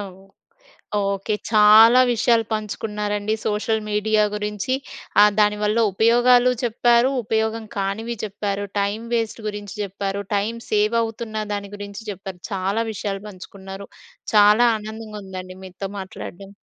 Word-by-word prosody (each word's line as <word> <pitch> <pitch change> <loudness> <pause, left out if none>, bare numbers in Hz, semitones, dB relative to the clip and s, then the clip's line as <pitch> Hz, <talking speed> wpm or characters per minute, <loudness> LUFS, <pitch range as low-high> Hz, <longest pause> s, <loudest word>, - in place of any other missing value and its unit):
ఓహ్! 190 -2 -8 0.8
Okay 200 +1 -1 0.2
చాలా 220 +3 +7
విషయాలు 230 0 +2
పంచుకున్నారండి. 210 0 -2
సోషల్ 220 +1 0
మీడియా 210 +1 +2
గురించి 210 +4 -2 0.6
దాని 210 0 +4
వల్ల 210 +2 +1
ఉపయోగాలు 245 +4 +4
చెప్పారు. 240 +2 +3
ఉపయోగం 220 +1 -1
కానివి 210 +4 -2
చెప్పారు, 205 0 -3 0.2
టైం 200 +2 -1
వేస్ట్ 230 -1 -1
గురించి 205 0 -7
చెప్పారు, 200 0 -3
టైం 210 +3 -1
సేవ్ 215 +2 +2
అవుతున్న 225 -1 -4
దాని 200 -1 -4
గురించి 205 +1 -8
చెప్పారు, 190 -1 -8
చాలా 195 +3 -1
విషయాలు 200 -1 -4
పంచుకున్నారు, 195 0 -10 0.5
చాలా 210 +3 +6
ఆనందంగా 215 0 -8
ఉందండి 185 -1 -8
మీతో 190 +1 -6
మాట్లాడడం. 190 0 -9
210 Hz, 120 wpm, -22 LUFS, 200-220 Hz, 0.8 s, చాలా